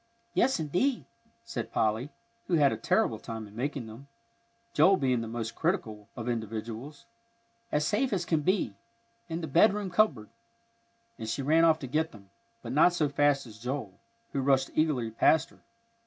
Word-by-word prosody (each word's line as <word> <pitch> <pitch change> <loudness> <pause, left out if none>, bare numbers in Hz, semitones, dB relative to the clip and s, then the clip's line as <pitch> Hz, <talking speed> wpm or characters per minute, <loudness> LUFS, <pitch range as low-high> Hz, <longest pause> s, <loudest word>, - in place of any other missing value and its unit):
"Yes, 265 -5 +2
indeed," 180 - 0 0.4
said 115 - -5
Polly, 110 +5 0 0.4
who 175 - +2
had 145 -3 +4
a - - -1
terrible 110 0 +1
time 110 -1 -6
in 105 0 -15
making 135 +1 -3
them, 115 +5 -11 0.7
Joel 190 +1 +5
being 130 -5 +1
the 115 - -5
most 115 0 -4
critical 115 - -2
of 120 0 -6
individuals, 115 +4 -5 0.7
"as 150 0 +1
safe 250 +5 +1
as 180 -4 -1
can 160 -3 +1
be, 185 - +1 0.6
in 165 +1 -3
the 160 - -4
bedroom 195 +6 +3
cupboard;" 165 - +2 0.9
and 110 - -5
she 135 +5 -2
ran 160 +4 +4
off 160 -1 +5
to 155 - -7
get 155 +5 -1
them, 100 -3 -16 0.3
but 120 - -5
not 155 +6 +5
so 155 -4 +1
fast 140 -1 +2
as 110 -2 -13
Joel, 125 -5 -5 0.3
who 140 - 0
rushed 135 0 +2
eagerly 140 -8 +1
past 155 +7 +3
her. - - -21
140 Hz, 170 wpm, -29 LUFS, 115-160 Hz, 0.9 s, Joel